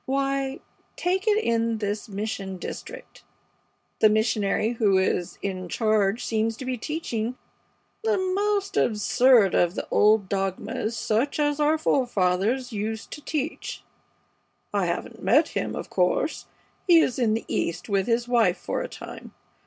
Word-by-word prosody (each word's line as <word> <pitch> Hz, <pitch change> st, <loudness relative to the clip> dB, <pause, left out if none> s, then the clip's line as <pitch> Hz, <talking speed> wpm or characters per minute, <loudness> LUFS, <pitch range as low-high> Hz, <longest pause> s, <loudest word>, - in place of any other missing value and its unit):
Why, 275 Hz, 0 st, -1 dB, 0.3 s
take 375 Hz, +3 st, -1 dB
it 425 Hz, -1 st, +4 dB
in 230 Hz, -1 st, +1 dB
this 210 Hz, +1 st, -3 dB
mission 200 Hz, -2 st, -4 dB
district. -, -, -9 dB, 0.8 s
The 215 Hz, -, +6 dB
missionary 215 Hz, 0 st, +1 dB
who 210 Hz, -5 st, +3 dB
is 185 Hz, -1 st, 0 dB
in 185 Hz, -2 st, -4 dB
charge 215 Hz, +1 st, +1 dB
seems 225 Hz, 0 st, 0 dB
to 260 Hz, -, -7 dB
be 255 Hz, 0 st, -1 dB
teaching 245 Hz, -3 st, -3 dB, 0.7 s
the 440 Hz, -2 st, +2 dB
most 395 Hz, +2 st, 0 dB
absurd 220 Hz, 0 st, +4 dB
of 175 Hz, 0 st, +2 dB
the -, -, -4 dB
old 210 Hz, -1 st, +4 dB
dogmas 195 Hz, +3 st, -2 dB
such 240 Hz, +8 st, 0 dB
as 290 Hz, 0 st, +1 dB
our 300 Hz, +1 st, +3 dB
forefathers 240 Hz, -3 st, +1 dB
used 220 Hz, +1 st, -4 dB
to 295 Hz, -, -7 dB
teach. 305 Hz, +1 st, -4 dB, 0.9 s
I -, -, +1 dB
haven't -, -, -4 dB
met -, -, +4 dB
him, -, -, -3 dB
of -, -, -6 dB
course. -, -, 0 dB, 0.4 s
He 345 Hz, -2 st, +7 dB
is 265 Hz, -6 st, +2 dB
in 220 Hz, -3 st, +2 dB
the 225 Hz, -, -4 dB
East 170 Hz, +1 st, -2 dB
with 195 Hz, -2 st, 0 dB
his 235 Hz, 0 st, +1 dB
wife 230 Hz, -7 st, +3 dB
for -, -, -3 dB
a -, -, -5 dB
time. -, -, -10 dB
225 Hz, 145 wpm, -25 LUFS, 205-275 Hz, 0.9 s, He